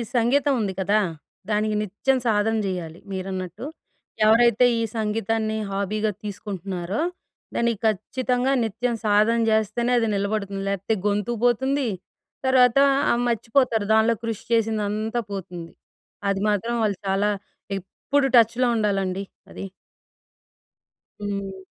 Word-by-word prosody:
సంగీతం 265 Hz, +4 st, +3 dB
ఉంది 195 Hz, -2 st, -1 dB
కదా! 200 Hz, +3 st, +2 dB, 0.5 s
దానికి 210 Hz, 0 st, +1 dB
నిత్యం 215 Hz, +6 st, 0 dB
సాధన 220 Hz, 0 st, +2 dB
చేయాలి 175 Hz, -4 st, -4 dB
మీరన్నట్టు. 185 Hz, +2 st, -5 dB, 0.6 s
ఎవరైతే 235 Hz, +2 st, +5 dB
ఈ -, -, 0 dB, 0.2 s
సంగీతాన్ని 220 Hz, 0 st, -1 dB
హాబీగా 210 Hz, +2 st, -1 dB
తీసుకుంటున్నారో 195 Hz, -, -4 dB, 0.5 s
దానికి 235 Hz, -3 st, +1 dB
ఖచ్చితంగా 250 Hz, +5 st, 0 dB
నిత్యం 230 Hz, +2 st, -1 dB
సాధన 215 Hz, +3 st, +4 dB
చేస్తేనే 220 Hz, +3 st, +1 dB
అది 225 Hz, -, +1 dB
నిలబడుతుంది. 200 Hz, -1 st, -2 dB
లేకపోతే 200 Hz, +3 st, -1 dB
గొంతు 205 Hz, +3 st, 0 dB
పోతుంది, 265 Hz, +2 st, +2 dB, 0.6 s
తర్వాత 250 Hz, -1 st, +5 dB, 0.3 s
ఆ! -, -, +4 dB
మర్చిపోతారు 230 Hz, -1 st, +1 dB
దాన్లో 220 Hz, +1 st, +4 dB
కృషి 225 Hz, -2 st, -4 dB
చేసిందంతా 220 Hz, 0 st, 0 dB
పోతుంది. 175 Hz, -3 st, -6 dB, 0.6 s
అది 195 Hz, -1 st, 0 dB
మాత్రం 230 Hz, +4 st, 0 dB
వాళ్ళు 205 Hz, -4 st, 0 dB
చాలా 195 Hz, +2 st, +2 dB, 0.5 s
ఎప్పుడు 270 Hz, +9 st, -1 dB
టచ్‌లో 235 Hz, +2 st, +4 dB
ఉండాలండి 195 Hz, -2 st, 0 dB, 0.3 s
అది. -, -, -7 dB, 1.6 s
హ్మ్. 200 Hz, -1 st, -4 dB
215 Hz, 110 wpm, -24 LUFS, 195-235 Hz, 1.6 s, ఎవరైతే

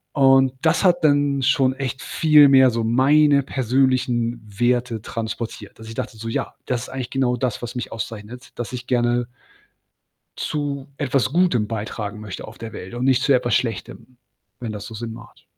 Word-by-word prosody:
Und 135 Hz, -2 st, +5 dB
das 160 Hz, +6 st, +2 dB
hat 175 Hz, -2 st, +3 dB
dann 145 Hz, -2 st, +3 dB
schon 130 Hz, 0 st, +3 dB
echt 130 Hz, -1 st, -4 dB
viel 150 Hz, -3 st, +5 dB
mehr 130 Hz, -1 st, +7 dB
so 115 Hz, -1 st, -2 dB
meine 140 Hz, +5 st, +4 dB
persönlichen 130 Hz, -2 st, 0 dB
Werte 120 Hz, +2 st, 0 dB
transportiert, 115 Hz, +1 st, -6 dB
dass 110 Hz, 0 st, -11 dB
ich 115 Hz, -, -8 dB
dachte 115 Hz, -, -5 dB
so: 115 Hz, +1 st, -6 dB
„Ja, 115 Hz, -, -3 dB
das 125 Hz, -2 st, -1 dB
ist -, -, -8 dB
eigentlich 130 Hz, -2 st, -5 dB
genau 130 Hz, -2 st, +1 dB
das, 125 Hz, -1 st, -2 dB
was 120 Hz, -, -5 dB
mich 125 Hz, -2 st, -5 dB
auszeichnet, 115 Hz, +1 st, -7 dB
dass 120 Hz, 0 st, -5 dB
ich 125 Hz, 0 st, -6 dB
gerne“ 120 Hz, -1 st, +1 dB, 1.1 s
„zu 145 Hz, -2 st, -3 dB
etwas 135 Hz, -3 st, 0 dB
Gutem 165 Hz, -11 st, +2 dB
beitragen 105 Hz, -1 st, -5 dB
möchte 100 Hz, -3 st, -7 dB
auf 110 Hz, -, -12 dB
der 115 Hz, -1 st, -7 dB
Welt 95 Hz, +5 st, -8 dB
und 120 Hz, +1 st, -3 dB
nicht 130 Hz, -1 st, +3 dB
zu 140 Hz, -, +3 dB
etwas 120 Hz, -1 st, +1 dB
Schlechtem“, 120 Hz, +2 st, -3 dB, 0.4 s
wenn 115 Hz, -3 st, -4 dB
das 105 Hz, -1 st, -7 dB
so 115 Hz, -, -9 dB
Sinn 115 Hz, +1 st, -5 dB
macht. 115 Hz, 0 st, -14 dB
125 Hz, 180 wpm, -22 LUFS, 115-135 Hz, 1.1 s, mehr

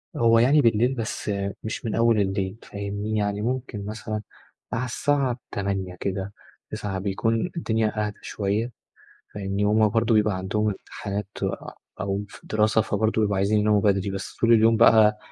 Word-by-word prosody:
هو 115 Hz, -1 st, +4 dB
يعني 140 Hz, +5 st, +5 dB
بالليل 120 Hz, +3 st, +3 dB
بس 115 Hz, -2 st, -3 dB, 0.3 s
مش 110 Hz, +1 st, -5 dB
من 110 Hz, -, -1 dB
أول 115 Hz, -1 st, +3 dB
الليل 95 Hz, +1 st, -1 dB
فاهمني، 100 Hz, +1 st, -4 dB
يعني 105 Hz, 0 st, -1 dB
ممكن 120 Hz, -3 st, -3 dB
مثلًا 110 Hz, 0 st, -4 dB, 0.5 s
على 125 Hz, +3 st, -1 dB
الساعة 130 Hz, 0 st, 0 dB
20:00 95 Hz, -2 st, -2 dB
كده 100 Hz, +1 st, -3 dB, 0.4 s
21:00 95 Hz, -2 st, -3 dB
بيكون 110 Hz, -, -1 dB
الدنيا 110 Hz, -5 st, 0 dB
أهدى 105 Hz, -, -8 dB
شوية 105 Hz, +4 st, -2 dB, 0.6 s
فاهمني، 100 Hz, 0 st, -2 dB
وهُم 105 Hz, +1 st, +4 dB
برضه 115 Hz, +1 st, +2 dB
بيبقى 105 Hz, -2 st, +3 dB
عندهم 100 Hz, +3 st, -1 dB
امتحانات 100 Hz, 0 st, -5 dB, 0.7 s
أو 100 Hz, 0 st, -2 dB
في -, -, -15 dB
دراسة 110 Hz, +1 st, +2 dB
فبرضه 110 Hz, +1 st, 0 dB
بيبقوا 105 Hz, -2 st, +1 dB
عايزين 100 Hz, +2 st, +2 dB
يناموا 105 Hz, -1 st, +3 dB
بدري 100 Hz, -1 st, +1 dB
بس 95 Hz, 0 st, -6 dB
طول 115 Hz, 0 st, +4 dB
اليوم 115 Hz, 0 st, +5 dB
بقى 110 Hz, -1 st, +6 dB
105 Hz, 155 wpm, -25 LUFS, 100-115 Hz, 0.7 s, بقى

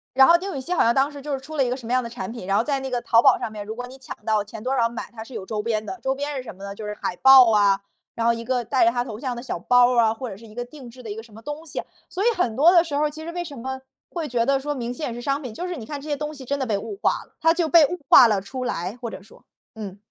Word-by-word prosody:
然 265 Hz, 0 st, +8 dB
后 340 Hz, -, +8 dB
丁 380 Hz, -1 st, -5 dB
宇 -, -, -3 dB
希 355 Hz, +7 st, -3 dB
好 -, -, +3 dB
像 235 Hz, +1 st, +3 dB
当 275 Hz, +2 st, +2 dB
时 285 Hz, -2 st, -10 dB
就 295 Hz, 0 st, -4 dB
是 270 Hz, -, -2 dB
出 310 Hz, +3 st, -9 dB
了 270 Hz, -, +3 dB
一 245 Hz, -, -1 dB
个 250 Hz, -, -1 dB
什 240 Hz, -4 st, -10 dB
么 240 Hz, -, -3 dB
样 255 Hz, 0 st, +3 dB
的 235 Hz, -, -6 dB
产 220 Hz, -4 st, -6 dB
品， 230 Hz, -6 st, -8 dB
然 195 Hz, +1 st, +1 dB
后 225 Hz, -, +3 dB
在 275 Hz, 0 st, -1 dB
那 265 Hz, -1 st, -5 dB
个 245 Hz, -1 st, -1 dB
淘 230 Hz, 0 st, +4 dB
宝 265 Hz, -3 st, +6 dB
上 220 Hz, -, -4 dB
面 210 Hz, -1 st, -7 dB
如 220 Hz, -, -5 dB
果 245 Hz, +1 st, -6 dB
你 260 Hz, +2 st, -12 dB
抢 260 Hz, -, -8 dB
到 215 Hz, -2 st, +2 dB
前 215 Hz, +1 st, -10 dB
多 260 Hz, +2 st, -1 dB
少 230 Hz, -1 st, +3 dB
买， 235 Hz, -, -7 dB
她 220 Hz, -1 st, -8 dB
是 260 Hz, -, -15 dB
有 195 Hz, -4 st, -6 dB
周 210 Hz, -1 st, -3 dB
边 215 Hz, -1 st, -1 dB
的， 380 Hz, -, -6 dB
周 265 Hz, 0 st, 0 dB
边 285 Hz, +1 st, -4 dB
是 260 Hz, -, -3 dB
什 230 Hz, -, -9 dB
么 195 Hz, -, -15 dB
呢？ 200 Hz, 0 st, -6 dB
就 215 Hz, -, -8 dB
是 210 Hz, -, -4 dB
海 180 Hz, -, -3 dB
报 265 Hz, -3 st, +8 dB
啊， 200 Hz, -2 st, +4 dB, 0.3 s
然 230 Hz, 0 st, -1 dB
后 235 Hz, -, +5 dB
一 230 Hz, 0 st, -6 dB
个 250 Hz, -1 st, -1 dB
戴 255 Hz, +1 st, +2 dB
着 230 Hz, -, +5 dB
她 240 Hz, 0 st, -1 dB
头 220 Hz, -4 st, -7 dB
像 255 Hz, -2 st, -3 dB
的 240 Hz, -, -7 dB
小 255 Hz, -, -4 dB
包 245 Hz, +6 st, +4 dB
儿 -, -, +1 dB
啊， 220 Hz, 0 st, +2 dB
或 255 Hz, +1 st, -6 dB
者 195 Hz, -, -8 dB
是 225 Hz, +2 st, -14 dB
一 215 Hz, -, -15 dB
个 245 Hz, 0 st, -4 dB
定 250 Hz, -1 st, -12 dB
制 250 Hz, +1 st, -13 dB
的 220 Hz, -, -7 dB
一 205 Hz, -, -5 dB
个 225 Hz, -, -7 dB
什 225 Hz, -2 st, -18 dB
么 220 Hz, -, -12 dB
东 295 Hz, +5 st, -7 dB
西， 280 Hz, -, -4 dB, 0.3 s
所 380 Hz, -, -3 dB
以 -, -, +2 dB
很 240 Hz, -11 st, 0 dB
多 315 Hz, +5 st, +6 dB
的 345 Hz, -1 st, +6 dB
时 300 Hz, -4 st, -6 dB
候 295 Hz, +1 st, +2 dB
儿 300 Hz, -, +1 dB
其 315 Hz, +1 st, -9 dB
实 335 Hz, -, -6 dB
为 350 Hz, 0 st, -3 dB
什 290 Hz, -7 st, -8 dB
么 265 Hz, +2 st, -5 dB, 0.3 s
会 330 Hz, -4 st, -4 dB
觉 235 Hz, -2 st, +1 dB
得 275 Hz, +1 st, +2 dB
说 295 Hz, +1 st, -3 dB
明 245 Hz, -2 st, -4 dB
星 300 Hz, +5 st, -4 dB
也 235 Hz, -, -4 dB
是 240 Hz, -, -7 dB
商 275 Hz, +2 st, 0 dB
品， 245 Hz, -6 st, -7 dB
就 360 Hz, -, -4 dB
是 360 Hz, -2 st, -4 dB
你 225 Hz, -4 st, -8 dB
看 290 Hz, -, -5 dB
这 305 Hz, -, -10 dB
些 290 Hz, -, 0 dB
东 300 Hz, +1 st, -5 dB
西 270 Hz, -2 st, -10 dB
真 280 Hz, +3 st, -2 dB
的 265 Hz, -, -2 dB
被 210 Hz, -3 st, 0 dB
物 400 Hz, -, -6 dB
化 -, -, +1 dB
了， -, -, -29 dB
它 325 Hz, +1 st, +4 dB
就 335 Hz, -2 st, 0 dB
被 325 Hz, -3 st, +7 dB
物 355 Hz, +3 st, -5 dB
化 240 Hz, -, +9 dB
了 205 Hz, -3 st, +1 dB
出 255 Hz, +6 st, -5 dB
来， 185 Hz, +2 st, -3 dB
或 235 Hz, -2 st, -4 dB
者 -, -, -9 dB
说。 210 Hz, -, -19 dB, 0.3 s
嗯。 200 Hz, -3 st, -7 dB
250 Hz, 395 characters per minute, -23 LUFS, 225-285 Hz, 0.3 s, 化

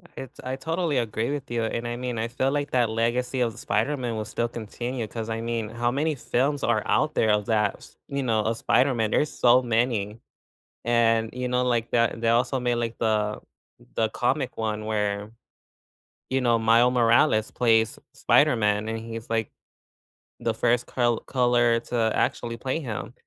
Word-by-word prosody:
It 135 Hz, -, -8 dB
I 130 Hz, +1 st, -3 dB
totally 160 Hz, +1 st, -1 dB
agree 115 Hz, 0 st, -1 dB
with 145 Hz, -2 st, -5 dB
you, 120 Hz, -1 st, 0 dB
and 115 Hz, +1 st, -3 dB
I 120 Hz, -, -3 dB
mean, 125 Hz, -1 st, -4 dB
I 115 Hz, -, -1 dB
feel 130 Hz, +3 st, 0 dB
like 145 Hz, 0 st, -2 dB
that 120 Hz, -3 st, +2 dB
legacy 120 Hz, +3 st, -1 dB
of 120 Hz, -2 st, +1 dB
the -, -, -16 dB
Spider-Man 120 Hz, +3 st, -1 dB
will 110 Hz, -, -2 dB
still 115 Hz, +3 st, -2 dB
continue 120 Hz, +2 st, -5 dB
'cause 115 Hz, 0 st, -6 dB
I 110 Hz, 0 st, -3 dB
mean, 115 Hz, -2 st, -3 dB
how 120 Hz, +1 st, -1 dB
many 150 Hz, +4 st, 0 dB
films 140 Hz, +2 st, -1 dB
are 115 Hz, -2 st, +2 dB
out 155 Hz, 0 st, +1 dB
there 110 Hz, -, +3 dB
of 105 Hz, -1 st, +1 dB
that 105 Hz, -2 st, +1 dB
s -, -, -17 dB
you 140 Hz, 0 st, -2 dB
know, 110 Hz, -3 st, +1 dB
of 110 Hz, +1 st, -1 dB
Spider-Man? 120 Hz, -3 st, +2 dB
There's 150 Hz, -, +1 dB
so 125 Hz, +1 st, +4 dB
many. 115 Hz, -3 st, 0 dB, 0.7 s
And 115 Hz, -1 st, +2 dB
you 125 Hz, 0 st, -3 dB
know, 125 Hz, 0 st, +1 dB
like 120 Hz, -2 st, 0 dB
that 115 Hz, -1 st, +1 dB
they 115 Hz, -, 0 dB
also 125 Hz, +3 st, +2 dB
made 120 Hz, -1 st, 0 dB
like 115 Hz, -1 st, -3 dB
the 105 Hz, -2 st, 0 dB, 0.5 s
the 110 Hz, -, +1 dB
comic 125 Hz, +4 st, -1 dB
one 110 Hz, -1 st, -2 dB
where, 105 Hz, -1 st, -2 dB, 1.0 s
you 130 Hz, 0 st, +1 dB
know, 120 Hz, -2 st, +3 dB
Mile 115 Hz, +2 st, +4 dB
Morales 115 Hz, -1 st, +3 dB
plays 110 Hz, -2 st, +2 dB
S -, -, -16 dB
Spider-Man 105 Hz, -2 st, +2 dB
and 115 Hz, 0 st, -3 dB
he's 115 Hz, 0 st, -8 dB
like 115 Hz, -1 st, -1 dB, 0.9 s
the 115 Hz, -, -1 dB
first 120 Hz, +1 st, +1 dB
col 120 Hz, -2 st, +1 dB
color 120 Hz, -2 st, +2 dB
to 115 Hz, -2 st, 0 dB
actually 115 Hz, 0 st, -1 dB
play 130 Hz, +5 st, -2 dB
him. 120 Hz, -, -5 dB
115 Hz, 185 wpm, -25 LUFS, 110-125 Hz, 1.0 s, so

